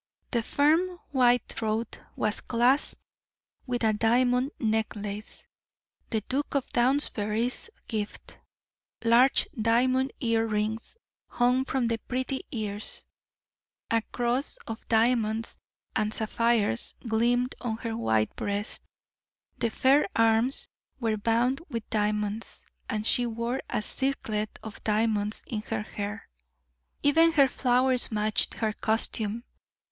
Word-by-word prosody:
The 235 - +1
firm 320 +9 +2
white 245 -3 +3
throat 220 +1 -3 0.2
was 215 0 0
clasped 245 +4 +2 0.7
with 245 -1 -2
a 220 -1 +3
diamond 245 +4 +2
necklace, 215 -2 -2 0.7
the 220 -2 0
Duke 280 +7 -3
of 275 - +1
Downsbury's 240 - +1 0.2
gift; 215 -2 -5 0.6
large 235 +3 +5
diamond 255 +3 +2
ear 225 -2 +1
rings 220 - -2 0.3
hung 250 +2 +2
from 265 -2 0
the 230 -1 0
pretty 260 +3 -3
ears, 210 -2 -3 0.9
a 230 0 +3
cross 245 +3 -1
of 225 0 -7
diamonds 225 -1 +1 0.4
and 215 0 +1
sapphires 220 - +1
gleamed 240 +3 +2
on 225 -3 -2
her 230 -1 -4
white 110 - +1
breast, 205 +2 -3 0.8
the 230 - +1
fair 270 +6 +3
arms 225 +3 +4 0.3
were 225 -3 0
bound 235 +6 +1
with 230 -5 -4
diamonds, 210 0 -1 0.2
and 215 -1 -2
she 245 +1 +4
wore 235 +3 -2
a 215 - -1
circlet 215 -5 -2
of 220 -2 -9
diamonds 215 -1 +1
in 220 -4 -4
her 220 0 -3
hair. 210 0 -6 0.8
Even 325 +3 +5
her 280 -4 +6
flowers 250 0 +2
matched 215 0 +1
her 220 -2 -1
costume. 220 0 0
230 Hz, 115 wpm, -28 LUFS, 215-250 Hz, 0.9 s, her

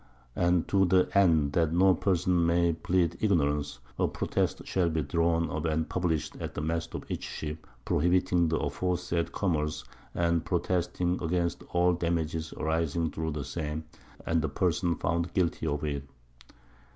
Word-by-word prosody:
_And 85 -1 +2
to 95 -1 +3
the 90 0 +3
End 80 -7 +4
that 80 -1 +2
no 95 +2 +5
Person 90 -1 +1
may 85 0 +3
plead 85 0 0
Ignorance, 75 - +1 0.2
a - - +3
Protest - - -1
shall 90 -3 +1
be 80 -1 -1
drawn 85 +3 +1
up 75 +2 -3
and 80 0 0
published 85 -4 -1
at - - -6
the - - -2
Mast 80 +1 -2
of - - -5
each - - -4
Ship, 75 0 -6 0.2
prohibiting 90 +1 +2
the 80 - +1
aforesaid 85 +2 -1
Commerce, 75 -5 -1 0.3
and 85 -1 +1
protesting 90 0 0
against 85 0 -1
all 90 0 +3
Damages 80 -2 -1
arising 80 0 -1
through 80 -1 -3
the 75 -2 -4
same, 75 +1 -4 0.4
and 80 0 +1
the 80 - -1
Person 85 +1 +1
found 85 +2 -1
guilty 85 -3 0
of 75 0 -1
it. 70 -2 -2
85 Hz, 155 wpm, -29 LUFS, 80-90 Hz, 0.4 s, no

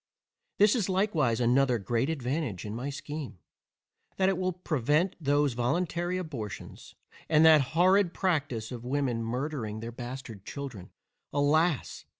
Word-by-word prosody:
There 205 - +7
is 210 -2 +2
likewise 170 - +1
another 125 +1 +3
great 120 +6 -1
advantage 135 - -2
in 105 - -5
my 125 +5 -4
scheme, 145 -4 -6 0.8
that 190 0 +3
it 190 - 0
will 185 0 0
prevent 160 0 0
those 145 -1 +2
voluntary 170 +8 -1
abortions, 130 - -7 0.3
and 155 0 +5
that 155 -2 +8 0.2
horrid 185 +1 +5
practice 145 - -1
of 120 -2 -6
women 125 -2 -1
murdering 120 -2 -3
their 115 +1 -6
bastard 120 -4 -8
children, 125 -9 -7 0.4
alas! 150 +2 +1
145 Hz, 135 wpm, -29 LUFS, 120-170 Hz, 0.8 s, that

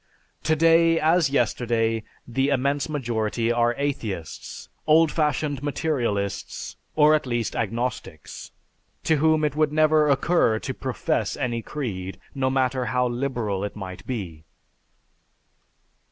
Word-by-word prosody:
"Today 165 +1 +4
as 160 -1 +3
yesterday 115 -3 +1 0.3
the 135 +3 0
immense 140 +2 0
majority 115 -5 -1
are 120 0 +2
atheists, 110 - -4 0.2
old 160 0 +5
fashioned 150 -2 0
materialists, 130 - -2 0.2
or 155 0 +6
at 150 -3 +1
least 120 -2 -2
agnostics, 115 -8 -4 0.5
to 160 - +2
whom 155 +1 +3
it 150 -1 -1
would 155 -1 +2
never 155 0 +4
occur 140 -4 +3
to - - -4
profess - - -2
any 120 -2 -2
creed, 100 -10 -5
no 130 -1 0
matter 130 -1 0
how 125 0 +1
liberal 120 -6 -2
it 105 - -4
might 95 -3 -7
be." 90 -11 -5
130 Hz, 120 wpm, -24 LUFS, 115-150 Hz, 0.5 s, or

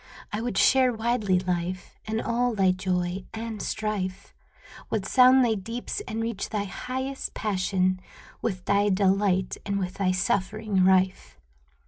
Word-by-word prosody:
I 210 - -1
would 240 +1 -3
share 260 -2 +5
widely, 220 -4 +1
Life, 180 0 -3
In 220 +1 -2
all 235 +1 0
thy 190 -2 +4
joy 185 0 -2
and 220 -1 -5
strife, 200 -3 -3 0.6
Would 205 -3 -1
sound 255 +3 +6
thy 230 - +2
deeps 230 - -4
and 225 +1 -3
reach 230 -3 -3
thy 210 -2 -1
highest 260 +6 -5
passion, 185 -2 0 0.4
With 185 -5 -3
thy 200 +1 +3
delight 190 -1 +2
and 200 -1 -2
with 185 0 -4
thy 190 -2 +2
suffering 195 +2 0
rife. 185 0 +2
200 Hz, 140 wpm, -26 LUFS, 185-225 Hz, 0.6 s, sound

